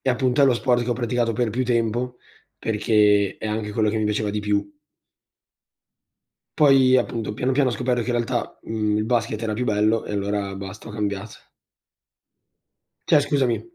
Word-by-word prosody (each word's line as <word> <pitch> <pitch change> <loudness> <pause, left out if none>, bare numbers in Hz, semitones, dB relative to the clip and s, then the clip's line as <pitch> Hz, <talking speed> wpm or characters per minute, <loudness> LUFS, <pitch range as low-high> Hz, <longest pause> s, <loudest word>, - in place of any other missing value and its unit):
e - - -3
appunto 130 +1 +1
è - - +8
lo 130 -2 +4
sport 120 0 +1
che 120 - -3
ho - - +3
praticato 120 -1 -1
per 115 0 -1
più 125 +4 -1
tempo, 120 +1 -1 0.4
perché 105 -2 +2
è 110 - -5
anche 105 0 -3
quello 110 0 +1
che 110 - -1
mi 110 - 0
piaceva 105 0 -1
di 105 +1 -2
più. 105 -1 0 1.9
Poi 135 -3 +5
appunto 115 -3 -3
piano 125 +5 -1
piano, 130 -1 +2
ho - - -3
scoperto 125 0 -1
che 115 - -7
in - - +1
realtà, 120 +1 -2
uhm, 105 -2 -1
il 105 - 0
basket 115 -3 0
era 110 -2 -2
più 125 +4 -2
bello 110 0 +1
e - - -6
allora 100 -1 -2
basta, 100 +3 -8
ho - - -8
cambiat 105 0 -5 1.6
Cioè 150 - +5
scusami, 140 -4 0
115 Hz, 185 wpm, -23 LUFS, 105-125 Hz, 1.9 s, è